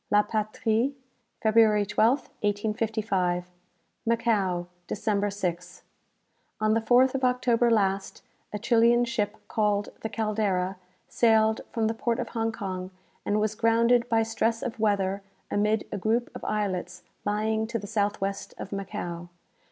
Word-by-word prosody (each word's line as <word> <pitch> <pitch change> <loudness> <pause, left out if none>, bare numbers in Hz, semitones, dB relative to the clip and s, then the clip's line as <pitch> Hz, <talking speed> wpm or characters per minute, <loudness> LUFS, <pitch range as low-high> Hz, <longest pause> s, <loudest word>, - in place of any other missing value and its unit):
"La 210 0 +5
Patrie," 220 +4 0 0.5
February 215 -2 +4
12th, 225 +6 +2
1855. 205 -4 0 0.6
"Macao, 215 -6 +1 0.2
December 205 -1 0
6. 180 -3 -4 0.8
"On 215 0 +2
the 225 - +2
4th 250 +3 +4
of 270 -1 -2
October 250 -1 +3
last, 195 -3 0 0.3
a 210 - -3
Chilian 235 +2 +4
ship, 215 -3 -2
called 210 -1 0
the 220 - -3
'Caldera,' 205 -4 -1 0.3
sailed 220 -1 +3
from 225 -1 0
the 220 - +1
port 230 +1 -1
of - - -3
Hong 225 -1 -1
Kong 185 -4 -5 0.4
and 205 +1 +2
was 215 0 0
grounded 235 +2 +3
by 225 -1 +3
stress 225 +1 -1
of 230 -2 -4
weather 200 -2 +1 0.3
amid 210 +1 +1
a 205 - -3
group 225 +5 0
of - - -9
islets 180 -4 -2 0.2
lying 220 +1 0
to 230 0 -2
the 205 - -7
south 205 -1 0
west 195 0 -4
of - - -7
Macao. 180 -4 -5
215 Hz, 140 wpm, -27 LUFS, 200-230 Hz, 0.8 s, La